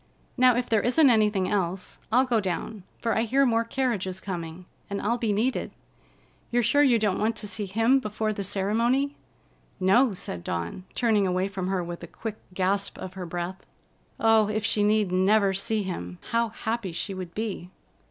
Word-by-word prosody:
Now, 255 -1 +5
if 245 0 -1
there 220 -2 +2
isn't 265 +2 +5
anything 210 -4 +2
else, 185 -2 -2
I'll 255 +3 +4
go 240 -3 +2
down, 190 +2 -3 0.2
for 230 - -1
I - - +2
hear 265 +5 +3
more 230 -2 +2
carriages 225 -7 -2
coming, 175 -2 -6 0.2
and 200 0 -2
I'll 235 +3 0
be 225 -3 0
needed. 225 +6 0 0.8
You're 240 0 +2
sure 285 +6 +4
you 260 -5 +5
don't 210 -4 0
want 220 +1 +1
to 210 -1 -5
see 205 0 -3
him 225 +7 +3
before 215 -2 -2
the 200 - -4
ceremony." 230 +9 +1 0.7
"No," 195 +4 +4
said 90 - -5
Dawn, 85 - -4
turning 215 -5 +2
away 185 +1 0
from 190 -2 -4
her 190 -2 0
with 170 0 -6
a 175 - -8
quick 215 +5 -6
gasp 195 +2 -1
of 185 - -7
her 185 -2 -6
breath. 175 +2 -5 0.6
Oh, 225 -2 +4
if 215 0 -1
she 210 - +1
need 210 -2 +2
never 195 +2 +3
see 210 +2 -1
him, 90 - -5
how 230 0 +2
happy 220 -3 -3
she 195 +4 -3
would 185 -2 -7
be! 210 -5 -4
210 Hz, 185 wpm, -26 LUFS, 185-230 Hz, 0.8 s, Now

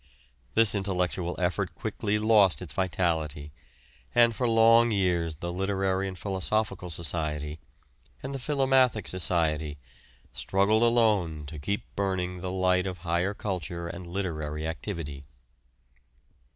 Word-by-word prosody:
This 115 -2 +5
intellectual 90 -3 -1
effort 90 0 -1
quickly 105 0 -2
lost 105 -7 +4
its - - -7
vitality, 80 -5 -1 0.6
and 120 -1 +5
for 125 - 0
long 115 +1 +6
years 90 -6 +1
the 85 +3 -5
Literary 95 0 0
and 95 -1 -6
Philosophical 95 0 -1
Society, 75 -2 -3 0.6
and 135 +1 -4
the 135 - -4
Philomathic 130 -4 +2
Society, 80 -5 0 0.6
struggled 100 +3 +2
alone 105 -10 +2
to 75 +2 -8
keep 100 +8 -2
burning 90 -2 -1
the 90 0 -3
light 95 0 +2
of 90 -1 -4
higher 85 +4 0
culture 85 -4 -4
and 90 +1 -7
literary 80 -4 -3
activity. 80 -5 -5
95 Hz, 120 wpm, -28 LUFS, 85-105 Hz, 0.6 s, long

